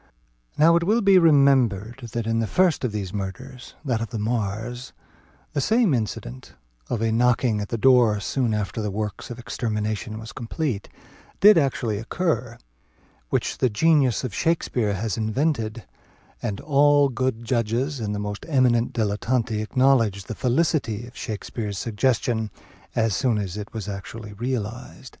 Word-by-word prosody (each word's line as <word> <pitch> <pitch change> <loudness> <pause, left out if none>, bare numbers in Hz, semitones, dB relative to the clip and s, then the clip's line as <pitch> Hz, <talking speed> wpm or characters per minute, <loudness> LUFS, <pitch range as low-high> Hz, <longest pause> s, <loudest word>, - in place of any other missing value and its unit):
Now 165 +3 +6
it 170 - 0
will 215 +6 +2
be 195 -2 +6
remembered 130 - +3
that 115 -2 -2
in 115 0 0
the 115 - 0
first 180 - +2
of 125 - 0
these 100 -3 -4
murders, 125 +6 -7
(that 120 -4 0
of 115 - -3
the 115 - -5
Marrs,) 110 +2 -3 0.6
the 145 - 0
same 220 - +3
incident 100 - -4 0.3
(of 115 - -1
a 115 - +1
knocking 120 -1 +2
at 105 - -5
the 115 - -2
door 120 -3 +4
soon 120 +3 -1
after 105 +1 -2
the 105 - -2
work 105 0 -4
of 120 - -6
extermination 110 -2 -3
was 110 0 -9
complete) 120 -2 -3 0.5
did 210 +2 +8
actually 125 -8 0
occur, 125 -2 -2 0.7
which - - -1
the 130 - +3
genius 135 0 +3
of 125 -6 -4
Shakspeare 120 -10 0
has 105 -1 -2
invented; 115 -1 -1 0.6
and 105 -4 -3
all 145 0 +4
good 130 -2 -2
judges, 120 +4 -1
and 105 -2 -2
the - - -3
most 105 0 -4
eminent 125 -5 +2
dilettanti, 110 +1 0
acknowledged 115 -5 +2
the - - -4
felicity 125 -3 0
of 120 - -14
Shakspeare's 105 -2 -5
suggestion 115 0 0 0.5
as 110 -4 +1
soon 120 +1 +1
as 100 -3 -3
it 105 0 -6
was 110 -3 -6
actually 105 +2 -7
realized. 120 +2 -5
115 Hz, 155 wpm, -24 LUFS, 105-130 Hz, 0.7 s, did